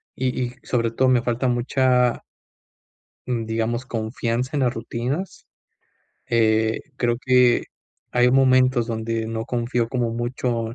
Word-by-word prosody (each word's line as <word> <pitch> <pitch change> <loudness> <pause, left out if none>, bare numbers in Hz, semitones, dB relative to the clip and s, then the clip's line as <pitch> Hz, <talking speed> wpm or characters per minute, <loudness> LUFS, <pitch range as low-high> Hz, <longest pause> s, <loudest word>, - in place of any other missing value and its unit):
y 130 0 -1
y 125 0 -5
sobre 115 -2 0
todo, 130 +3 +2
me 125 -2 +4
falta 120 +2 0
mucha 125 0 +2 1.0
mm, 120 -3 -2
digamos 115 +3 -2
confianza 115 +2 -2
en - - +1
las 120 -1 +1
rutinas. 125 - -4 0.8
Eh, 110 -1 +2 0.2
creo 120 -1 +1
que 125 -2 +4 0.5
hay 125 0 +3
momentos 130 -2 +4
donde 115 -1 -2
no 110 0 -3
confío 120 -1 -1
como 120 -2 -1
mucho, 120 -1 -2
120 Hz, 130 wpm, -22 LUFS, 115-125 Hz, 1.0 s, me